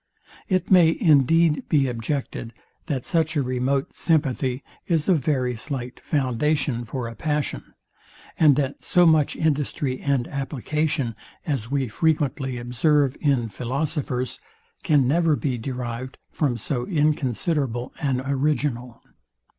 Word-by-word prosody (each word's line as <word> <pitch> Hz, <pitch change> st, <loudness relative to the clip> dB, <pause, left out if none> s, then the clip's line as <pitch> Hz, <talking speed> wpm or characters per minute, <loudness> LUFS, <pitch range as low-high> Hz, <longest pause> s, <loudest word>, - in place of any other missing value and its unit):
It 185 Hz, -1 st, 0 dB
may 170 Hz, -3 st, +6 dB
indeed 160 Hz, -, +3 dB
be 140 Hz, -3 st, +3 dB
objected, 120 Hz, -1 st, -4 dB, 0.3 s
that 135 Hz, -4 st, -2 dB
such 165 Hz, -2 st, +1 dB
a 145 Hz, -, +2 dB
remote 130 Hz, +2 st, -1 dB
sympathy 135 Hz, -5 st, 0 dB, 0.2 s
is 165 Hz, -4 st, +1 dB
a 190 Hz, -, +5 dB
very 130 Hz, -5 st, 0 dB
slight 125 Hz, 0 st, -5 dB
foundation 135 Hz, -2 st, 0 dB
for 120 Hz, +1 st, -4 dB
a 115 Hz, -, -7 dB
passion, 150 Hz, +3 st, -3 dB, 0.6 s
and 150 Hz, -4 st, +6 dB
that 140 Hz, -1 st, -2 dB
so 180 Hz, -2 st, +4 dB
much 155 Hz, -3 st, +4 dB
industry 145 Hz, -3 st, -1 dB
and 135 Hz, -4 st, 0 dB
application, 140 Hz, -1 st, -2 dB, 0.3 s
as 135 Hz, -7 st, -2 dB
we 135 Hz, -1 st, 0 dB
frequently 135 Hz, -1 st, 0 dB
observe 135 Hz, +3 st, +1 dB
in 135 Hz, -6 st, +2 dB
philosophers, 130 Hz, +2 st, -3 dB, 0.4 s
can 145 Hz, -7 st, +3 dB
never 160 Hz, +2 st, +3 dB
be 130 Hz, -5 st, -2 dB
derived 125 Hz, +1 st, -5 dB
from 135 Hz, -6 st, 0 dB
so 120 Hz, +2 st, -3 dB
inconsiderable 145 Hz, -, 0 dB
an 130 Hz, -3 st, 0 dB
original. 135 Hz, -3 st, -1 dB
140 Hz, 125 wpm, -24 LUFS, 125-155 Hz, 0.6 s, may